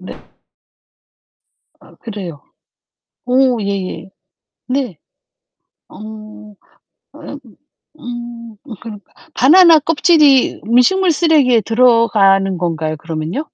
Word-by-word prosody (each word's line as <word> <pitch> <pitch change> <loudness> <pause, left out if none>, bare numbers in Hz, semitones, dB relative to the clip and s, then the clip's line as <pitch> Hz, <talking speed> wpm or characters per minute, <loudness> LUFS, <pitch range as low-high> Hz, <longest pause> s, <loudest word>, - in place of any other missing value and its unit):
네. - - -10 1.6
아 - - -20
그래요. 190 - -9 0.8
오 250 -2 +1
예예. 195 -1 -5 0.6
네. 255 - -3 0.9
어 - - -15 1.2
어 - - -11 0.6
음 240 -2 -9 0.3
그러니까 210 -4 -12 0.2
바나나 330 +4 +5
껍질이 300 -3 +2
음식물 340 +11 +2
쓰레기에 290 -8 +2
들어가는 215 -5 +2
건가요, 160 -2 -3
그러면요? 160 - -5
235 Hz, 175 characters per minute, -15 LUFS, 195-275 Hz, 1.6 s, 바나나